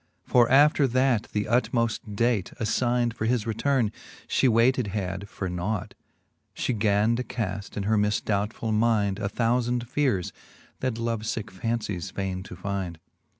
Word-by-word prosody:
For 120 -1 +4
after 145 +1 +5
that 130 -2 +2
the 105 - 0
utmoft 115 -2 0
date, 115 -3 +1
aflynde 120 +1 +1
For 110 - -3
his 115 -2 +1
returne, 115 0 +1 0.4
fhe 130 - +3
waited 120 +1 +3
had 100 0 -4
for 95 - -4
nought, 90 +3 -3 0.6
She 125 - -1
gan 105 +1 +2
to 125 - -1
caft 100 -5 -4
in 100 - -1
her 110 +1 +2
mifdoubtful 105 +2 0
mynde 105 -3 +2
A 100 -2 -1
thoufand 120 +2 0
feares, 125 -10 0 0.5
that 130 -3 -1
love 115 -1 -1
licke 110 -1 -4
fancies 105 -3 -3
faine 95 -1 -3
to - - -9
fynde, 95 -2 -3
IV. 80 - -26
110 Hz, 150 wpm, -26 LUFS, 100-120 Hz, 0.6 s, after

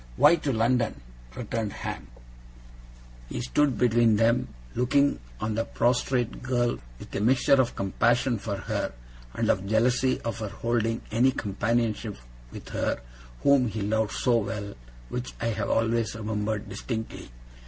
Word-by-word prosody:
'Why 170 - +7
to 145 - -1
London?' 120 - +1 0.4
returned 110 -3 -3
Ham. - - -5 1.2
He - - -4
stood 135 +2 +1
between 120 -2 +4
them, 115 +3 +3 0.3
looking 140 +4 +2 0.2
on 110 0 -1
the 115 +1 0
prostrate 120 +1 0
girl 120 -1 0 0.2
with - - -10
a - - 0
mixture 130 +3 +4
of 120 - -2
compassion 120 +5 +1
for 100 0 -3
her, 95 - -2 0.4
and - - 0
of 95 +1 -2
jealousy 125 +4 +2
of 115 0 -3
her 110 -2 -3
holding 115 +1 -1
any 120 +4 +4
companionship 110 - -1 0.3
with - - -9
her - - -1 0.4
whom 140 -3 +5
he 110 -1 -3
loved 110 +1 0
so 120 -2 +2
well, 100 -1 -4 0.4
which 125 0 -5
I 115 - 0
have 110 - -2
always 115 -1 +1
remembered 105 -1 -2
distinctly. 110 -3 -5
115 Hz, 145 wpm, -27 LUFS, 110-125 Hz, 1.2 s, Why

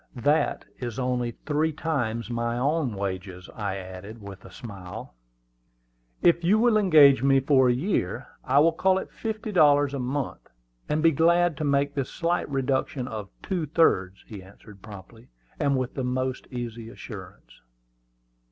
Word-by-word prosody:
"That 145 +5 +1
is 120 -3 -5
only 125 -2 -1 0.2
three 155 +1 +1
times 120 -8 -2
my 120 0 -1
own 140 -2 0
wages," 95 -2 -5
I 100 -3 -3
added 95 +4 -9
with 100 -2 -10
a 95 - -13
smile. 95 - -9 1.1
"If 170 0 +4
you 190 +6 +4
will 235 0 +3
engage 155 -10 +6
me 135 0 +4
for 130 -1 +4
a - - +5
year, 125 - -1 0.2
I 135 - +1
will 165 +2 +5
call 190 +3 +2
it - - -5
fifty 215 -1 -5
dollars 145 -6 +4
a 140 - -3
month, 130 +2 -4 0.4
and 155 +1 0
be 165 - +6
glad 170 +2 +3
to - - -3
make 140 0 +1
this 140 -2 -2
slight 170 -2 -1
reduction 135 -1 -1
of 105 -4 -6
two 180 -6 -2
thirds," 100 - +2
he 105 -3 -9
answered 100 +1 -16
promptly, 105 +3 -12 0.3
and 140 -2 +2
with 130 -1 -3
the 130 - -3
most 130 +1 -2
easy 120 -2 -6
assurance. - - -11
130 Hz, 160 wpm, -26 LUFS, 110-155 Hz, 1.1 s, engage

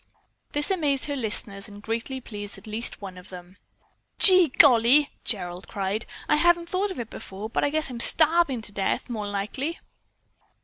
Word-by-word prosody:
This 295 +5 +4
amazed 295 -7 +1
her 285 - -3
listeners 210 -5 -4
and 205 -1 -12
greatly 230 +5 -4
pleased 205 -3 -8
at - - -14
least 220 0 -4
one 185 -2 -8
of 180 - -16
them. 180 +1 -12 0.6
"Gee 370 -3 +7
golly!" 265 +1 +5
Gerald 180 -4 -4
cried. 200 +3 -3 0.2
"I - - +3
hadn't 340 +1 +2
thought 385 +3 -1
of 375 - -7
it 230 -2 -6
before, 205 +3 -8
but - - -1
I 290 - +2
guess 310 +1 -1
I'm 240 - -7
starving 315 -3 +3
to 210 - -9
death 200 +4 -2
more'n 210 -3 -4
likely." 260 - -3
235 Hz, 175 wpm, -25 LUFS, 205-295 Hz, 0.6 s, Gee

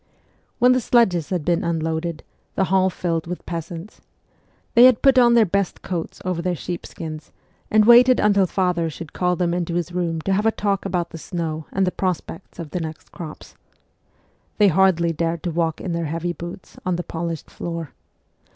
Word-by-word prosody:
When 250 +1 +5
the 255 0 +3
sledges 190 -10 +2
had 180 -5 -2
been 175 -1 +1
unloaded, 165 0 -2 0.3
the - - +2
hall 190 0 +3
filled 165 -2 -2
with 180 +1 -6
peasants. 170 +3 -7 0.7
They 240 +1 +8
had 255 -3 +5
put 270 -2 +6
on 240 -1 +5
their 230 -2 +6
best 200 0 -1
coats 175 -3 -5
over 180 -2 -1
their 180 0 -1
sheepskins, 160 -2 -7 0.4
and 215 0 +4
waited 245 +2 +7
until 200 -2 +3
father 180 -3 0
should 160 0 -9
call 180 -1 +1
them 175 -1 0
into 175 -1 -2
his 175 0 -2
room 170 -2 -1
to 195 - 0
have 210 +3 +2
a - - +4
talk 200 -3 -1
about 175 -3 -2
the 165 - -8
snow 160 -2 -4
and 195 0 +1
the 180 - 0
prospects 185 -1 -4
of 165 -4 -7
the 180 - -2
next 160 -1 -7
crops. 160 -3 -9 1.0
They 205 -2 +5
hardly 170 -2 +3
dared 165 0 -2
to 175 - -2
walk 165 -1 -1
in 180 - -4
their 170 0 -2
heavy 165 +3 -2
boots 175 +1 -9
on 180 -1 0
the 175 - -3
polished 165 -2 -5
floor. 165 -3 -5
175 Hz, 190 wpm, -22 LUFS, 165-190 Hz, 1.0 s, They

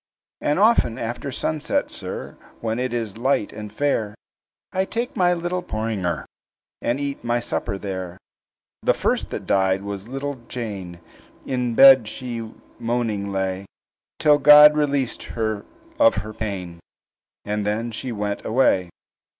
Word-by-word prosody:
"And 145 - +1
often 205 - +4
after 120 +4 -4
sunset, 155 +3 -1
sir, - - -6 0.2
When 115 +1 -2
it 130 -1 -1
is 115 -3 -3
light 130 -4 +1
and 105 -1 -7
fair, 110 -4 -1 0.6
I 190 - +1
take 235 +5 -3
my 180 -1 +3
little 175 +1 -2
porringer, 110 - -2 0.6
And 120 +3 0
eat 140 -1 -4
my 120 0 +1
supper 115 -3 -3
there. 95 -3 -5 0.6
"The - - +2
first - - 0
that - - -5
died 95 0 +2
was 100 0 -6
little 135 0 -5
Jane; 100 -8 -6 0.5
In 125 -3 -1
bed 135 -4 +8
she 115 -1 -6 0.3
moaning 115 -4 -1
lay, 95 0 -2 0.5
Till 150 -1 +4
God 150 0 +9
released 140 -4 0 0.2
her 110 -2 -1 0.3
of 285 -2 +6
her 110 - -7
pain, 95 -6 -5 0.7
And 105 0 -1
then 110 +3 -1
she 125 +3 -5
went 105 -2 -3
away. 105 -7 +2
115 Hz, 140 wpm, -23 LUFS, 100-135 Hz, 0.7 s, God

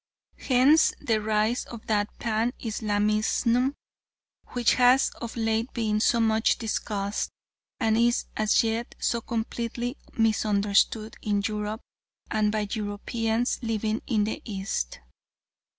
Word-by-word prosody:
Hence 270 +5 +4
the 220 -2 0
rise 215 +3 +1
of 235 -2 -10
that 210 -1 +1
Pan 230 +1 0
Islamism 220 +4 +1 0.8
which 245 -2 +3
has 255 +2 +4
of 235 0 -6
late 225 +1 0
been 215 -3 0
so 230 +2 +3
much 220 0 +2
discussed 210 -2 -2 0.5
and 220 -1 +2
is 235 +1 +2
as 215 +1 +3
yet 225 +1 -2
so 235 - 0
completely 235 +3 -3 0.2
misunderstood 215 0 +2
in 205 -1 0
Europe 210 +1 -3 0.5
and 210 -1 +2
by 215 0 0
Europeans 225 +2 -1
living 220 -1 -1
in 215 -4 +2
the 215 - -3
East. 190 - -4
220 Hz, 120 wpm, -26 LUFS, 210-235 Hz, 0.8 s, Hence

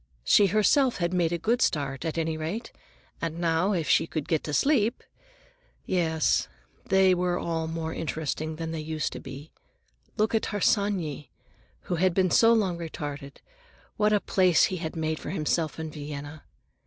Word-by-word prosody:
She 205 - +5
herself 235 +6 +3
had 175 0 -1
made 175 -2 +1
a 170 - 0
good 235 +8 0
start, 140 - 0
at 160 0 -3
any 160 -1 -1
rate, 165 +9 -4 0.5
and 165 -1 -3
now, 170 +3 +1
if 165 -5 -1
she - - +3
could 155 -3 -4
get 160 -3 0
to 150 - -4
sleep—Yes, 250 - -1 0.4
they 190 -1 +5
were 180 0 0
all 165 -2 -2
more 160 0 -4
interesting 155 0 -3
than 165 0 -5
they 165 - -4
used 155 0 -3
to - - -6
be. 135 +3 -10 0.7
Look 215 +2 +1
at 220 - +1
Harsanyi, 190 - 0 0.5
who 175 - -3
had 185 0 +2
been 185 -2 +2
so 230 0 +6
long 195 -7 +1
retarded; 145 -4 -7 0.5
what 210 0 +2
a 210 - +4
place 185 -4 +3
he - - -2
had 160 -1 -5
made 160 -1 -2
for - - -7
himself 160 -1 -1
in 160 -1 -5
Vienna. 145 0 -8
165 Hz, 165 wpm, -27 LUFS, 155-195 Hz, 0.7 s, so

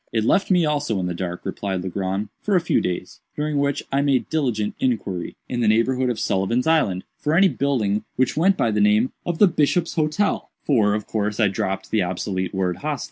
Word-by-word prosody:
"It 110 -2 0
left 195 - +2
me 180 -3 +4
also 145 -8 0
in 90 - -2
the 90 - -2
dark," 90 0 -4
replied 95 -3 -3
Legrand, 95 +2 -3
"for 205 - +1
a - - +6
few 170 - +1
days; 90 -1 -4 0.2
during 150 -1 -1
which 140 0 0
I 135 +1 +2
made 140 -3 +1
diligent 120 -10 0
inquiry, 105 -8 -2
in 125 - -3
the 115 - +2
neighborhood 125 +4 +2
of 120 -3 -2
Sullivan's 110 +4 0
Island, 135 - +2 0.2
for 150 +2 0
any 190 +2 +6
building 110 - 0
which 130 -1 +1
went 190 +5 +3
by 115 - +1
the 105 0 +1
name 105 +4 +3 0.2
of 175 -2 -1
the 205 - +6
'Bishop's 165 +1 +1
Hotel;' 160 +6 0
for, 105 -7 +3
of 105 - -3
course, 105 0 -2
I 105 -3 +4
dropped 95 0 -3
the 110 - +2
obsolete 95 +1 -2
word 95 -2 -1
'hostel. 150 -2 -3
115 Hz, 210 wpm, -22 LUFS, 100-150 Hz, 0.2 s, a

